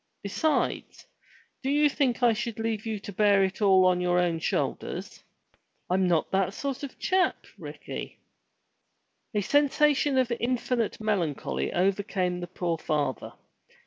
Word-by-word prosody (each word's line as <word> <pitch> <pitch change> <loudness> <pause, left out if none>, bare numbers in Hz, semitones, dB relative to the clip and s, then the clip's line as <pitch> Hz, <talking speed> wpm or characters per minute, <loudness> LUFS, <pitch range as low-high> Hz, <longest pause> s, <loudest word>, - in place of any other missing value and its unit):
Besides, 300 +10 -1 0.6
do 265 - -2
you 295 +1 +4
think 260 -4 0
I 235 -1 +5
should 230 0 -4
leave 225 -1 -2
you 220 -2 -2
to 205 - -8
bear 200 0 +4
it 190 +2 -2
all 190 -2 +5
on 180 -1 +3
your 180 0 +1
own 175 -2 +1
shoulders? - - -3 0.7
I'm 185 0 +2
not 170 -3 +1
that 190 0 0
sort 275 -2 -4
of 280 -2 -6
a - - -31
chap, 370 0 0
Ricky." - - -8 1.2
A 210 - +2
sensation 290 +2 +2
of 255 -2 +2
infinite 245 -2 -1
melancholy 195 -9 -1
overcame 185 -1 0
the 175 - -5
poor 175 -2 -3
father. 145 -5 -2
205 Hz, 145 wpm, -27 LUFS, 180-255 Hz, 1.2 s, I